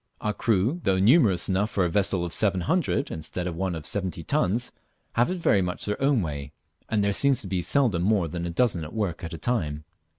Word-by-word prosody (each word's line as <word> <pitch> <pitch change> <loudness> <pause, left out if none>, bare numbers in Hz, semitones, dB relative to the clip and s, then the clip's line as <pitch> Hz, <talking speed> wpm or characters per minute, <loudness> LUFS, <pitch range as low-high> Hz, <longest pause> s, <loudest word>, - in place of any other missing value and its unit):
Our 105 - -1
crew; 115 - +1
though 95 -2 +2
numerous 105 - +4
enough 100 +3 +1
for 95 -4 +1
a - - 0
vessel 95 -1 0
of 85 - -5
700 95 -4 +1
instead 80 +3 -4
of 90 -2 -3
one 95 0 -2
of 80 -2 -7
70 95 -4 -1
tons, 120 - 0 0.4
have 120 +1 +2
it 185 - -2
very 105 - +3
much 90 -1 -3
their 105 +3 -3
own 135 -6 +3
way, 70 -3 -5 0.4
and 105 -2 +1
there 100 0 +1
seems 140 +3 +3
to - - -6
be 90 -1 -1
seldom 115 -5 +2
more 95 -2 +2
than 85 +2 -4
a - - -3
dozen 85 -1 +1
at 75 - -8
work 100 -7 -2
at 85 - -5
a - - -7
time. 80 -7 -2
95 Hz, 225 wpm, -26 LUFS, 85-110 Hz, 0.4 s, numerous